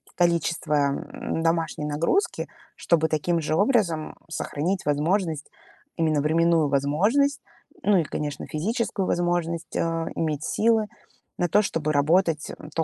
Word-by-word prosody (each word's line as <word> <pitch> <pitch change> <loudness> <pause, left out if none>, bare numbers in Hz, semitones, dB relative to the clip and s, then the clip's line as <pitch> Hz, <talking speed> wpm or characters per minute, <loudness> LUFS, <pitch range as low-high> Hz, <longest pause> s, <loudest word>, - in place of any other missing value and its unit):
количество, 170 -2 +1
м, 145 +2 -1
домашней 165 -2 0
нагрузки, 160 - 0 0.3
чтобы 160 -2 +1
таким 165 +2 0
же 155 0 -1
образом 190 - +1 0.2
сохранить 170 +4 -2
возможность, 155 +2 0 0.5
именно 155 -3 +2
временную 165 0 +3
возможность, 205 - +2 0.4
ну 205 -5 +4
и, 170 - +3
конечно, 145 0 -4
физическую 200 +4 -1
возможность, 175 -2 -1
э, - - 0 0.4
иметь 155 -2 -1
силы 220 +2 +2 0.5
на 175 - 0
то, 210 - +5
чтобы 160 -6 -1
работать, 160 +2 +2
м, 150 - -11
то 165 - 0
165 Hz, 125 wpm, -25 LUFS, 150-185 Hz, 0.5 s, то